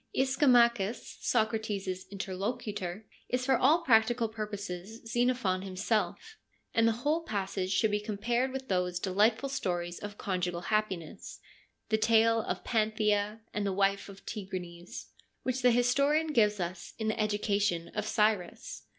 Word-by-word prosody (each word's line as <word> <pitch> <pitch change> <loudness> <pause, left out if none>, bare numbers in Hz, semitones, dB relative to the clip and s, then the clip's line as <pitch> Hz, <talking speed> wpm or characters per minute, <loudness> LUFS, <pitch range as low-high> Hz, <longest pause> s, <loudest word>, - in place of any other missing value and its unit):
Ischomacbus, 240 -5 +3
Socrates' 210 -5 -1
interlocutor, 200 0 -4 0.2
is 250 0 0
for 265 0 +4
all 305 +8 +4
practical 230 0 +4
purposes 210 -1 -6
Xenophon 240 -5 +1
himself, 215 - -2 0.3
and 225 0 +4
the - - +4
whole 310 +3 +2
passage 195 - -3
should 210 +2 +2
be 210 - +1
compared 235 +5 -1
with 265 0 -5
those 180 -3 0
delightful 210 +8 +2
stories 175 -9 -2
of 205 0 -7
conjugal 180 -2 -2
happiness 190 -5 -3 0.3
— - - -45
the 220 - +2
tale 225 +1 +4
of - - -4
Panthea, 215 -1 +1
and 210 - -1
the 200 - 0
wife 195 +1 +1
of 195 0 -13
Tigranes 180 -4 -7 0.2
— - - -46
which 255 0 -1
the 250 - +6
historian 280 +6 +2
gives 210 -4 +3
us 175 0 -5
in 220 - -2
the 220 - -2
Education 205 -4 0
of 210 +3 -3
Cyrus. 210 -5 -1
215 Hz, 140 wpm, -30 LUFS, 190-235 Hz, 0.3 s, the